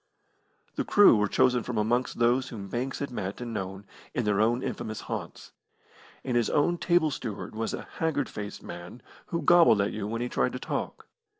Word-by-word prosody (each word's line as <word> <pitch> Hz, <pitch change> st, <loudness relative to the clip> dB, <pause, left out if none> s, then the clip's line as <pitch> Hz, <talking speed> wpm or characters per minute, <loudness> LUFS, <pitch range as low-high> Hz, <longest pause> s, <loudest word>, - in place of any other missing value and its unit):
The -, -, +1 dB
crew 205 Hz, -, +6 dB
were 105 Hz, -1 st, +2 dB
chosen 125 Hz, +4 st, +3 dB
from 115 Hz, 0 st, -4 dB
amongst 120 Hz, +4 st, 0 dB
those 120 Hz, +2 st, +2 dB
whom 100 Hz, -5 st, -7 dB
Banks 130 Hz, +4 st, -2 dB
had 140 Hz, -2 st, -4 dB
met 100 Hz, -4 st, -4 dB
and 120 Hz, -2 st, -5 dB
known 95 Hz, -1 st, -5 dB, 0.3 s
in 125 Hz, -, +1 dB
their 105 Hz, -1 st, +2 dB
own 120 Hz, +3 st, +2 dB
infamous 110 Hz, -1 st, -4 dB
haunts, -, -, -6 dB, 0.7 s
and 125 Hz, -2 st, -2 dB
his 120 Hz, -2 st, +2 dB
own 170 Hz, +4 st, +2 dB
table 170 Hz, -3 st, +3 dB
steward 110 Hz, -6 st, -5 dB
was 110 Hz, +1 st, -2 dB
a -, -, -9 dB
haggard 145 Hz, -4 st, 0 dB
faced 105 Hz, -1 st, -7 dB
man, 85 Hz, +7 st, -9 dB, 0.2 s
who 170 Hz, -1 st, -2 dB
gobbled 165 Hz, -9 st, +6 dB
at 100 Hz, -, +1 dB
you 105 Hz, -1 st, -3 dB
when 115 Hz, +2 st, -3 dB
he 120 Hz, -, -1 dB
tried -, -, 0 dB
to -, -, -4 dB
talk. -, -, -4 dB
120 Hz, 195 wpm, -28 LUFS, 105-130 Hz, 0.7 s, crew